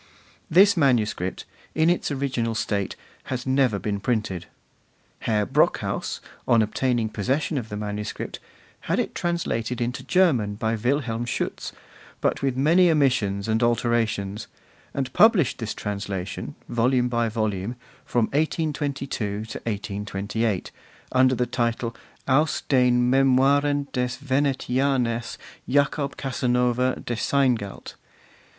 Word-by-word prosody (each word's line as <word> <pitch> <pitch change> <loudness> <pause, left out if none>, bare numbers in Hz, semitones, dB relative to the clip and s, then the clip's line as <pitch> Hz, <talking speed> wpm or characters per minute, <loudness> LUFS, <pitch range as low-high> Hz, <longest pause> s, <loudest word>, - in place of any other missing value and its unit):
This 200 +5 +6
manuscript, 115 - +1 0.3
in 160 +1 +3
its 175 +1 +1
original 130 -5 -1
state, 105 -3 -1 0.3
has 130 -1 -4
never 130 -5 +2
been 100 0 -2
printed. 105 -5 -2 0.7
Herr 105 -2 0
Brockhaus, - - 0 0.3
on 115 -2 +5
obtaining 120 +1 0
possession 130 - -1
of 120 -5 -3
the 105 - -4
manuscript, 105 0 -4 0.5
had - - +2
it - - -1
translated 125 -9 -2
into 120 0 -2
German 135 - +2
by 110 +1 -1
Wilhelm 120 0 -1
Schutz, 120 - -3 0.5
but - - 0
with 135 -2 0
many 170 +6 +5
omissions 125 -10 +2
and 110 +1 +1
alterations, 115 -3 0 0.4
and 130 -2 -3
published 210 - +4
this 115 -3 -4
translation, 100 -2 -4
volume 125 +1 +2
by 120 -1 0
volume, 110 0 -2 0.3
from 120 -2 +1
1822 145 -2 -1
to 105 -6 -3 0.3
1828, 100 0 -2 0.4
under 130 0 +4
the 125 +1 +1
title, 115 -1 -1 0.3
'Aus 150 +4 +2
den 125 -2 +3
Memoiren 140 +2 +3
des 125 -1 +1
Venetianers 130 -3 0 0.3
Jacob 140 +1 +1
Casanova 125 -1 +1
de 120 - -2
Seingalt. 120 -5 0
125 Hz, 115 wpm, -24 LUFS, 110-135 Hz, 0.7 s, This